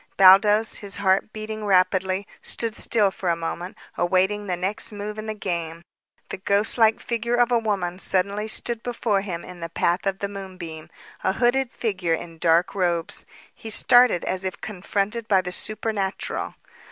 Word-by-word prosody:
Baldos, 205 +3 +6
his 200 -1 -6
heart 195 +1 +1
beating 215 0 -6
rapidly, 190 0 +2 0.2
stood 230 -1 -2
still 210 -4 +4
for 185 -1 -3
a 170 - +2
moment, 170 +2 -5 0.2
awaiting 190 +4 +1
the 180 -2 -1
next 195 +5 -2
move 210 +1 -6
in 215 - -6
the 215 - -3
game. 170 -4 -4 0.5
The - - -5
ghost 200 +5 +3
like 220 -1 +4
figure 235 -1 -2
of 240 0 +2
a 240 - +4
woman 190 -5 -2
suddenly 200 +3 0
stood 230 +1 -1
before 230 -4 -1
him 180 -4 -5
in 180 -1 -11
the 165 0 -5
path 175 +3 0
of 195 -1 0
the 200 - -3
moonbeam, 185 -5 -8 0.3
a - - +1
hooded 245 +3 +1
figure 180 -7 -1
in 165 0 -10
dark 170 +1 +3
robes. 175 -4 0 0.3
He 225 - -9
started 245 -3 +4
as 185 0 -2
if 185 -1 -4
confronted 210 +3 -2
by 195 -3 +4
the 180 -1 -5
supernatural. 210 -1 -2
195 Hz, 170 wpm, -24 LUFS, 180-215 Hz, 0.5 s, Baldos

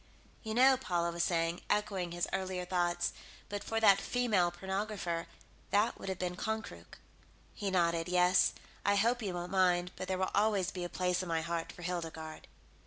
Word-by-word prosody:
"You 220 -1 -4
know," 260 +2 +6
Paula 175 -8 -1
was 170 0 -1
saying, 170 0 0
echoing 195 -4 0
his 175 0 -1
earlier 185 -1 -2
thought, 175 -1 0 0.4
"but 205 0 -4
for 225 - -1
that 200 -3 +6
female 215 -8 +2
pornographer, 190 -2 -3 0.4
that 210 +3 +2
would - - -5
have 190 - -2
been 180 0 -2
Konkrook." 180 - -5 0.6
He 200 - -3
nodded. 170 -2 +1
"Yes. 180 +1 +4 0.3
I 200 +1 +3
hope 235 +4 +2
you 195 -4 -3
won't 175 0 -5
mind, 180 -2 +3
but 185 - -5
there 190 - -1
will 185 0 -1
always 205 -4 +2
be 180 - -5
a 175 - -3
place 180 0 0
in 185 - -5
my 165 -1 +1
heart 165 0 -3
for 175 - -11
Hildegarde." 165 -3 -5
180 Hz, 180 wpm, -33 LUFS, 175-200 Hz, 0.6 s, know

